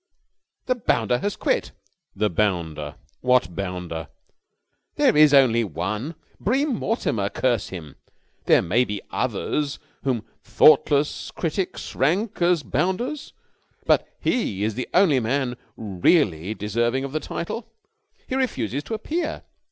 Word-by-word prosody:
"The 255 Hz, -, +2 dB
bounder 120 Hz, -, +1 dB
has 205 Hz, +8 st, -2 dB
quit!" -, -, -1 dB, 0.4 s
"The 105 Hz, -1 st, +1 dB
bounder? 85 Hz, -7 st, -1 dB, 0.2 s
What 125 Hz, -8 st, +2 dB
bounder?" 90 Hz, -4 st, -4 dB, 0.9 s
"There -, -, +3 dB
is 150 Hz, -1 st, +7 dB
only 125 Hz, -5 st, +5 dB
one! 105 Hz, -, -3 dB, 0.2 s
Bream 270 Hz, +6 st, +1 dB
Mortimer, 115 Hz, -, -1 dB
curse 120 Hz, -2 st, 0 dB
him! 80 Hz, -7 st, -9 dB, 0.5 s
There -, -, +5 dB
may 110 Hz, +9 st, +3 dB
be 105 Hz, -4 st, -5 dB
others 145 Hz, -2 st, -1 dB, 0.3 s
whom 125 Hz, -5 st, -1 dB, 0.2 s
thoughtless 150 Hz, -1 st, +4 dB
critics 175 Hz, +2 st, -3 dB
rank 180 Hz, -, 0 dB
as 175 Hz, -3 st, +3 dB
bounders, 240 Hz, +11 st, -2 dB, 0.5 s
but -, -, +3 dB
he 105 Hz, -, 0 dB
is 110 Hz, +1 st, 0 dB
the 125 Hz, +4 st, -4 dB
only 175 Hz, -8 st, +4 dB
man 125 Hz, +1 st, -1 dB, 0.2 s
really 100 Hz, -, +1 dB
deserving 120 Hz, +5 st, 0 dB
of 140 Hz, -, -4 dB
the 155 Hz, -, -1 dB
title. 215 Hz, +9 st, -5 dB, 0.6 s
He -, -, -5 dB
refuses 145 Hz, -, -1 dB
to 225 Hz, -, -3 dB
appear! 310 Hz, +9 st, -3 dB
125 Hz, 125 wpm, -24 LUFS, -, 0.9 s, is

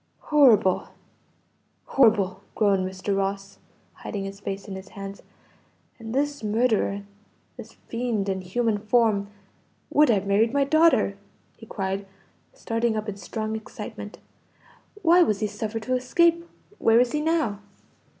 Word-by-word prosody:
"Horrible, 230 Hz, -11 st, +5 dB, 1.0 s
horrible!" 200 Hz, -7 st, +3 dB
groaned 195 Hz, -3 st, +2 dB
Mr. 190 Hz, +1 st, -3 dB
Ross, 195 Hz, 0 st, -3 dB, 0.3 s
hiding 200 Hz, -3 st, -6 dB
his 195 Hz, 0 st, -7 dB
face 195 Hz, 0 st, -6 dB
in 200 Hz, -, -6 dB
his 190 Hz, 0 st, -9 dB
hands. 195 Hz, 0 st, -8 dB, 0.8 s
"And 225 Hz, -1 st, -7 dB
this 285 Hz, +1 st, -1 dB
murderer, 215 Hz, -2 st, +1 dB, 0.5 s
this -, -, -11 dB
fiend 230 Hz, -4 st, -2 dB
in 190 Hz, -1 st, -2 dB
human 210 Hz, +3 st, -1 dB
form, 215 Hz, -2 st, +2 dB, 0.6 s
would 300 Hz, -2 st, +5 dB
have 200 Hz, -4 st, +2 dB
married 215 Hz, +4 st, +2 dB
my 280 Hz, 0 st, +3 dB
daughter!" 275 Hz, -9 st, +3 dB, 0.4 s
he 225 Hz, -, -14 dB
cried, 195 Hz, 0 st, -3 dB, 0.4 s
starting 230 Hz, -, -1 dB
up 215 Hz, 0 st, -4 dB
in 210 Hz, -, -4 dB
strong 215 Hz, +2 st, -4 dB
excitement. 220 Hz, -, -8 dB, 0.9 s
"Why 350 Hz, +1 st, +6 dB
was 215 Hz, -, +2 dB
he 215 Hz, -, 0 dB
suffered 215 Hz, +2 st, -4 dB
to 255 Hz, +3 st, 0 dB
escape? 335 Hz, +6 st, +2 dB, 0.3 s
Where 225 Hz, +1 st, +5 dB
is 245 Hz, -1 st, +2 dB
he 300 Hz, -, -1 dB
now?" 310 Hz, -10 st, 0 dB
215 Hz, 135 wpm, -25 LUFS, 200-250 Hz, 1.0 s, Why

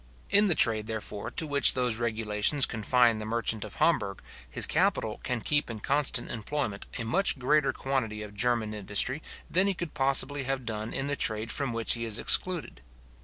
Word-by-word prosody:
In 205 Hz, +1 st, +5 dB
the 175 Hz, -, +2 dB
trade, 110 Hz, -4 st, +3 dB
therefore, 110 Hz, -2 st, -5 dB
to 160 Hz, -, -1 dB
which 145 Hz, -3 st, +5 dB
those 125 Hz, -3 st, +1 dB
regulations 110 Hz, +3 st, +1 dB
confine 115 Hz, 0 st, +2 dB
the -, -, -5 dB
merchant 115 Hz, -1 st, -2 dB
of 105 Hz, -, -9 dB
Hamburg, 100 Hz, -12 st, 0 dB, 0.3 s
his -, -, 0 dB
capital 170 Hz, -, 0 dB
can 125 Hz, -2 st, -2 dB
keep 145 Hz, +2 st, 0 dB
in 115 Hz, -2 st, -6 dB
constant 140 Hz, 0 st, -1 dB
employment 110 Hz, -2 st, -4 dB
a 120 Hz, -, -2 dB
much 185 Hz, -, +1 dB
greater 140 Hz, +2 st, +2 dB
quantity 115 Hz, -6 st, -3 dB
of 105 Hz, -1 st, -10 dB
German 115 Hz, 0 st, 0 dB
industry 105 Hz, +7 st, -2 dB, 0.3 s
than 185 Hz, +3 st, +2 dB
he 195 Hz, -, 0 dB
possibly 145 Hz, -3 st, +1 dB
could 130 Hz, -, -6 dB
have 135 Hz, -2 st, -2 dB
done 110 Hz, 0 st, -4 dB
in 135 Hz, -, -2 dB
the 140 Hz, 0 st, 0 dB
trade 110 Hz, -3 st, -1 dB
from 140 Hz, -4 st, -1 dB
which 115 Hz, -1 st, 0 dB
he 115 Hz, -, -4 dB
is 110 Hz, -2 st, +1 dB
excluded. 175 Hz, -, 0 dB
120 Hz, 185 wpm, -28 LUFS, 110-145 Hz, 0.3 s, In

